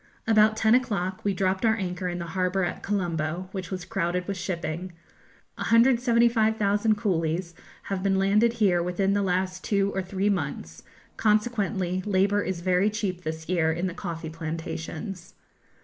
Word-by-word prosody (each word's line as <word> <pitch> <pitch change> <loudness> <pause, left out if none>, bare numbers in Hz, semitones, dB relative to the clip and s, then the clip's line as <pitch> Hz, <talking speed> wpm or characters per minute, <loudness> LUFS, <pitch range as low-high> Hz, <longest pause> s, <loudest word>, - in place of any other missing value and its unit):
About 215 -1 +4
ten 220 0 +4
o'clock 210 -6 0
we 205 - +1
dropped 190 +1 0
our 220 -1 +4
anchor 180 -3 -3
in 175 - -3
the 170 - -4
harbour 185 0 +1
at 175 - -3
Colombo, 175 -3 -2
which 185 -3 -5
was 185 -2 -5
crowded 180 -1 -1
with 200 - -2
shipping. 180 -1 -4 0.6
175,000 230 -3 +3
coolies 170 -4 -1 0.3
have 195 -2 -3
been 195 0 +2
landed 210 +4 +3
here 195 -7 +2
within 180 +3 0
the 205 - +1
last 185 0 -1
two 200 -1 +1
or 190 - -1
three 190 +2 -2
months; 145 - -2 0.4
consequently 210 -4 +1
labour 200 +1 +2
is 185 -3 -3
very 185 +3 +2
cheap 200 -4 -3
this 160 -1 -5
year 165 -3 +2
in 170 +3 -2
the 180 - -2
coffee 170 -3 -5
plantations. 165 +3 -6
190 Hz, 155 wpm, -26 LUFS, 175-205 Hz, 0.6 s, About